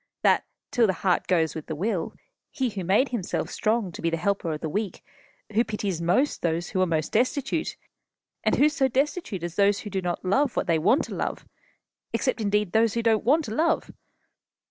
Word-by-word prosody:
that, - - +4 0.3
till 235 -2 +4
the 190 - +1
heart 180 -2 +2
goes 165 -4 +2
with 160 - -7
the 160 - -3
will, 185 0 -2 0.3
he 260 -2 -1
who 195 -2 -4
made 205 +10 +3
himself 225 -8 -3
strong 215 -3 0
to - - -9
be 165 - +1
the 165 - -1
helper 180 -1 -1
of 155 - -3
the 160 - -3
weak, 200 +3 -3 0.5
who 225 +3 +4
pities 205 -6 -3
most 215 - +1
those 170 0 -1
who 185 - 0
are 185 - +3
most 160 -2 -1
destitute 270 +6 0 0.7
and - - +3
who 290 - +5
so 300 -3 +2
destitute 265 - -1
as 170 -1 -5
those 200 0 +3
who 210 - -7
do 190 - -1
not 175 0 -3
love 265 +8 +2
what - - 0
they 165 -2 +2
want 250 - +3
to - - -7
love - - -3 0.7
except, - - 0
indeed, 210 -2 +1
those 225 +1 +3
who 230 - 0
don't 225 -2 +3
want 295 +7 +3
to 215 - -5
love? 320 +6 +1
205 Hz, 210 wpm, -26 LUFS, 175-240 Hz, 0.7 s, who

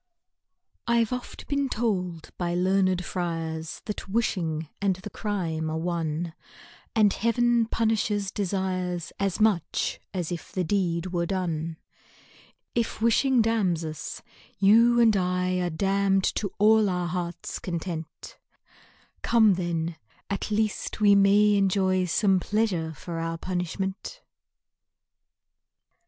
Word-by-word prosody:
I 235 0 +4
'VE 225 - -5
oft 250 - -9
been 280 -1 0
told 185 -9 -2
by 175 -1 -1
learned 185 0 +2
friars, 165 -3 -4
That 210 -2 -5
wishing 170 -8 -1
and 195 -2 +2
the 195 +3 -9
crime 165 -7 -2
are 160 - -2
one, 165 -1 -2 0.6
And 210 -3 +4
Heaven 235 0 +2
punishes 210 -3 0
desires 185 -3 -2
As 195 0 -1
much 210 -6 +1
as 180 -3 -3
if 175 - -6
the 185 - 0
deed 180 -1 -1
were 170 -1 0
done 165 -4 -2 1.0
If 235 -2 -1
wishing 235 +2 +3
damns 195 -8 +1
us, 155 -1 -6 0.3
you 230 +5 +5
and 225 -3 +5
1 180 -1 0
Are 175 - 0
damn'd 195 +3 +1
to 200 - -2
all 215 0 +5
our 180 -1 -1
heart's 175 0 -4
content, 170 -2 -6 0.8
Come 220 -4 +5
then, 170 -2 -2 0.3
at 200 - -2
least 215 0 -1
we 205 -1 +6
may 200 +1 +5
enjoy 190 -2 +2
Some 190 +1 +2
pleasure 190 -6 0
for 165 +3 -6
our 165 0 -3
punishment 190 - -4
190 Hz, 120 wpm, -26 LUFS, 170-210 Hz, 1.0 s, we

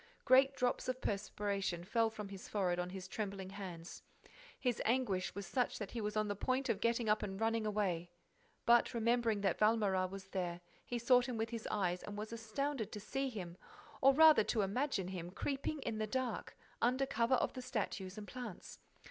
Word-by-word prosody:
Great 270 +1 +6
drops 250 0 0
of 255 0 -1
perspiration 200 -4 -2
fell 225 +4 +2
from 210 -2 -7
his 195 -1 -9
forehead 180 -4 0
on 180 0 -2
his 190 0 -7
trembling 195 -1 -4
hands. 180 -4 -7 0.6
His 250 -4 0
anguish 220 -8 +1
was 200 -1 -4
such 250 +7 0
that 205 -3 -5
he 235 - -3
was 210 0 -2
on 215 0 +2
the 205 - -1
point 260 +5 0
of 205 - +1
getting 230 0 +1
up 210 0 +3
and 195 -1 -4
running 225 -1 +1
away—But, 200 +5 0
remembering 230 -2 +2
that 195 -4 +1
Valméras 205 -4 +3
was 195 0 -8
there, 175 -3 -3 0.2
he 245 - -3
sought 245 +1 +4
him 245 -3 -3
with 225 +1 -2
his 230 -2 -4
eyes 180 -3 0
and 205 0 -7
was 215 +2 -5
astounded 230 +2 -2
to 210 - -4
see 270 +6 -2
him, 180 -7 -6 0.4
or 270 - +8
rather 310 -2 +7
to 220 - +1
imagine 200 -2 -1
him, 175 -2 -5
creeping 275 +9 -2
in 220 -4 -3
the 215 - 0
dark, 255 0 -3 0.2
under 255 +3 +3
cover 235 0 +2
of - - 0
the 255 - -5
statues 205 -6 -3
and 210 -1 -7
plants. 240 -7 -8
215 Hz, 190 wpm, -36 LUFS, 195-245 Hz, 0.6 s, or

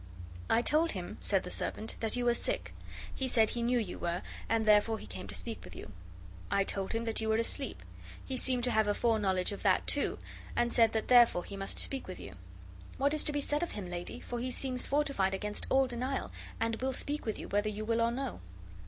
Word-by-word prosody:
"I 235 - +4
told 320 +5 +3
him," - - -6
said - - +2
the - - -6
servant, 220 - -2
"that 225 0 -1
you 245 -1 -1
were 240 - +4
sick. - - -2 0.4
He 265 - -1
said 225 -3 +4
he 235 - -2
knew 245 +1 +2
you 215 -6 -3
were, 175 +1 -2 0.3
and 225 -1 +2
therefore 215 +1 +4
he - - -9
came 185 - -7
to - - -5
speak 230 -2 -4
with 90 -1 -11
you. 105 - -9 0.6
I 200 - +3
told 195 +1 -2
him 230 +1 -1
that 225 -1 0
you 220 - -1
were 220 - +3
asleep. 230 +1 0 0.4
He 265 - -3
seemed 255 -1 +1
to 250 - +2
have 220 -1 +3
a 205 - +2
foreknowledge 205 -6 +1
of 200 - -6
that, - - +3
too, - - +1 0.4
and 240 0 +1
said 225 -2 +4
that 220 - -1
therefore 240 -7 +6
he 200 - -8
must 195 0 -3
speak 270 -1 +1
with 185 - -7
you. 95 - -9 0.6
What 280 +2 +2
is 305 - +2
to - - +1
be 290 -1 -1
said 295 +1 +1
to 345 - -1
him, 200 - -6
lady? 175 0 -5
for 240 - -5
he 255 +2 -2
seems 255 0 0
fortified 275 -10 +1
against 210 +2 -3
all 270 0 +4
denial, 255 +2 -3 0.3
and 230 0 -1
will 265 0 0
speak 290 0 -3
with 220 - -1
you, - - -7
whether 205 +1 +1
you 215 +1 -4
will 230 +1 +1
or 230 - +3
no." 260 +2 -4
230 Hz, 235 wpm, -32 LUFS, 210-255 Hz, 0.6 s, therefore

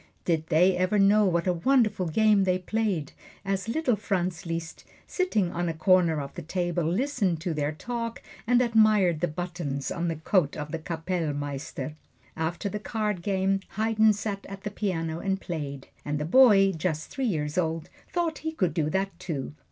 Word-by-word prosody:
Did 160 -2 0
they 180 +3 +4
ever 185 +3 +1
know 205 +1 +5
what 170 -3 +1
a 180 - +2
wonderful 215 -1 +2
game 210 +4 +4
they 185 -1 +2
played, 185 -5 -1 0.3
as 195 +1 -1
little 255 -2 +1
Franz 180 -4 -2
Liszt, 165 0 -5 0.2
sitting 220 - 0
on 175 0 -1
a 165 - -3
corner 170 -2 +3
of 140 - -7
the 175 - -6
table, 175 +1 -1
listened 195 - 0
to 170 0 -2
their 150 -1 -1
talk 230 +7 -4 0.3
and 245 +1 +4
admired 215 -7 +4
the 175 - +1
buttons 160 -4 -4
on 170 0 -2
the 165 - -1
coat 160 -1 +1
of 150 0 -5
the 165 - -3
Kappellmeister? 155 -5 -3 0.4
After 165 +5 -2
the 210 +1 -3
card 210 -3 -2
game 195 0 +1 0.2
Haydn 220 0 +4
sat 205 -1 -4
at 195 0 -9
the 210 - -3
piano 165 -6 -2
and 195 0 -1
played, 145 -7 -5 0.2
and 145 0 -2
the 150 - -2
boy, 195 -1 +6
just 160 -2 -3
three 270 -2 -2
years 150 -7 -1
old, 165 -2 -1 0.2
thought 340 -3 -1
he 320 0 -4
could 185 - 0
do 155 -3 0
that, 195 +4 0
too. 145 -5 -4
180 Hz, 180 wpm, -27 LUFS, 160-210 Hz, 0.4 s, boy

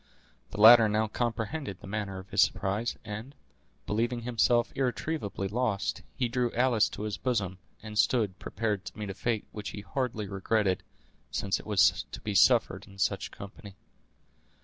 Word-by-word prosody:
The 105 - -7
latter 110 0 +9
now 110 +1 +2
comprehended 115 - -3
the - - -12
manner 100 -1 -4
of 95 0 -10
his - - +4
surprise, 105 +5 0
and, 110 +7 -7 0.5
believing 120 +4 -1
himself 120 0 +2
irretrievably 125 -6 -2
lost, 110 -3 -1
he 125 -3 0
drew 120 0 0
Alice 120 -3 +3
to 105 - -7
his 105 -2 -3
bosom, 100 -8 -1 0.2
and 105 -1 -4
stood 105 -6 +2
prepared 105 -3 -2
to - - -9
meet 105 -2 -4
a - - -6
fate 110 +3 -2
which 105 -1 -6
he 105 - -7
hardly 110 0 -3
regretted, 95 0 0 0.5
since 100 -1 -1
it - - -12
was 100 -6 +3
to - - -6
be 105 - -3
suffered 95 - +4
in 95 - -15
such - - 0
company. 100 0 -11
110 Hz, 165 wpm, -29 LUFS, 100-120 Hz, 0.5 s, latter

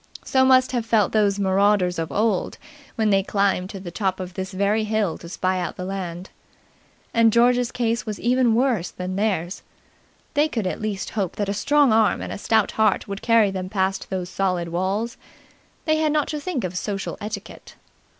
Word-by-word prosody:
So 260 -1 +3
must 260 -1 +5
have 245 -3 -1
felt 220 -4 +2
those 205 -2 +2
marauders 195 -2 +2
of 165 0 -3
old 210 -3 0 0.4
when 220 -2 +1
they 195 0 +4
climbed 195 -2 0
to 195 - -7
the 180 -2 -8
top 190 0 -1
of 185 -1 -6
this 190 +1 -5
very 200 +3 +1
hill 215 -5 0
to 170 - -10
spy 185 +1 -1
out 175 -2 -3
the 180 - -5
land. 185 -2 -5 0.8
And 230 -1 +5
George's 245 +1 +3
case 235 -1 -1
was 215 -2 -5
even 245 -1 +2
worse 235 -8 +1
than 185 +1 -5
theirs. 190 -4 -1 0.7
They 295 +1 +3
could 230 -9 -3
at 185 - -3
least 210 -3 -3
hope 195 -5 -2
that 205 -1 -2
a - - 0
strong 280 +4 +3
arm 220 -1 +3
and - - -5
a - - -6
stout 225 +2 +2
heart 215 -2 +1
would 200 0 -5
carry 230 -4 +4
them 185 -1 -4
past 190 -1 -1
those 185 -2 -3
solid 180 -3 -1
walls; 195 +7 -2 0.7
they 310 -1 +2
had 310 -1 +1
not 300 -1 +1
to 300 - -3
think 295 -5 -3
of 180 0 -4
social 195 +1 -3
etiquette. 205 -1 -8
205 Hz, 195 wpm, -23 LUFS, 185-230 Hz, 0.8 s, must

